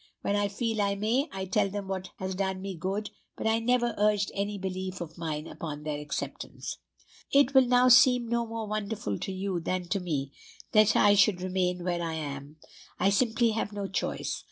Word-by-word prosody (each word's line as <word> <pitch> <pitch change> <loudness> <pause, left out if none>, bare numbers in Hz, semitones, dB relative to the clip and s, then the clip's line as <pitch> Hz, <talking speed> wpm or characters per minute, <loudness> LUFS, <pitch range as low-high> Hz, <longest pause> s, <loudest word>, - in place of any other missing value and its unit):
When 200 - +1
I 205 0 +2
feel 220 +1 -1
I 200 0 +1
may, 230 +8 0
I 190 0 -4
tell 190 +1 +1
them 200 0 -5
what 190 -1 -4
has 190 0 -3
done 190 0 -2
me 195 0 -5
good, 195 +5 -3 0.3
but - - -5
I 220 +1 +3
never 240 +1 +1
urge 210 -1 +2
any 205 +1 -2
belief 185 -1 -4
of 165 -2 -7
mine 155 -3 -4
upon 150 -3 -6
their 150 -1 -3
acceptance. 150 0 -5 0.5
"It 275 -1 +4
will 265 -2 +6
now 250 +1 +5
seem 250 -1 +6
no 235 0 0
more 225 0 -4
wonderful 210 - -3
to - - -4
you 190 -1 -2
than 180 +1 -2
to 200 - +1
me, 145 -7 -3 0.4
that 215 0 +5
I 205 - +6
should 200 -2 +4
remain 180 -1 -1
where 175 -1 -1
I 165 -1 -2
am. 145 -1 -6 0.4
I 195 - +3
simply 230 +2 +2
have 215 -1 -2
no 200 -1 -3
choice. 195 - -2
195 Hz, 200 wpm, -28 LUFS, 180-220 Hz, 0.5 s, will